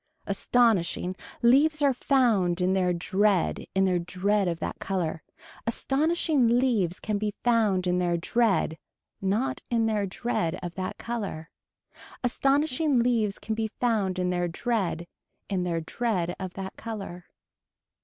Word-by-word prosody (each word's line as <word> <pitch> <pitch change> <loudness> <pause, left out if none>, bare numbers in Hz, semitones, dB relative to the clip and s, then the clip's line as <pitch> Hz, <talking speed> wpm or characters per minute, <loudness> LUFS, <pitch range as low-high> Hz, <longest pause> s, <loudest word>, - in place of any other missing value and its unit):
Astonishing 200 -4 +1 0.3
leaves 290 +5 +4
are 280 -2 +4
found 225 -10 +2
in 185 +1 +2
their 185 -2 +2
dread 190 +2 +1
in 190 0 +4
their 180 -2 +2
dread 190 +3 0
of 170 -1 -2
that - - -4
color. 170 -5 -2 0.5
Astonishing 275 -1 +2
leaves 220 -9 +1
can 210 -2 -2
be 210 -1 -2
found 215 -6 +2
in 180 0 +1
their 175 -1 +1
dread 195 -4 +1 0.4
not 225 +8 0
in 230 -2 +2
their 210 -3 0
dread 185 -5 -2
of 175 -1 -4
that 185 0 -4
color. 205 -9 -5 0.7
Astonishing 275 +3 +2
leaves 230 -4 +2
can 220 - -4
be 220 0 -1
found 210 -6 +1
in 180 0 0
their 175 -1 0
dread 175 -2 -1 0.4
in 190 -3 0
their 170 -2 -1
dread 175 -1 -1
of 185 -2 -6
that 190 -1 -6
color. 195 -6 -6
200 Hz, 140 wpm, -27 LUFS, 180-240 Hz, 0.7 s, leaves